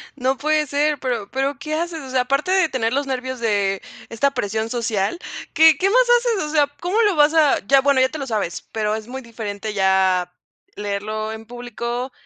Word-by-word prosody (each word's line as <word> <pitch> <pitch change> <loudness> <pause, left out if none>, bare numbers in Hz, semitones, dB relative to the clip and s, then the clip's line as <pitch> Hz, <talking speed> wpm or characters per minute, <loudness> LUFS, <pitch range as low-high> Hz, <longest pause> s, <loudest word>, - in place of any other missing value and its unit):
No 260 0 0
puede 305 0 +1
ser, 290 +1 0
pero 235 -6 -3
pero, 270 +1 -1
¿qué 305 +2 -3
haces? 335 0 -3
O 265 - -9
sea, 255 -1 +2
aparte 275 +8 0
de 375 -4 +3
tener 230 -2 -1
los 280 0 0
nervios 260 -1 -3
de 200 -4 0 0.3
esta 275 +5 +1
presión 220 -1 -2
social, 230 - -1 0.3
¿qué 320 -2 +6
qué 390 +1 +2
más - - +5 0.2
haces? 465 -6 -1
O - - -5
sea, 295 -2 +3
¿cómo 380 +6 +1
lo 405 -4 +2
vas 295 +1 +4
a? 310 -3 +4
Ya 275 0 +5
bueno, 275 -1 +3
ya 260 - +3
te 310 - -6
lo 275 -2 -5
sabes, 210 -7 -2
pero 215 -1 -1
es 220 +1 -7
muy 265 +1 -6
diferente 215 -3 -6
ya 190 -2 +2 0.4
leerlo 210 +2 -3
en 220 0 -8
público 240 +1 -5
255 Hz, 205 wpm, -21 LUFS, 220-295 Hz, 0.4 s, qué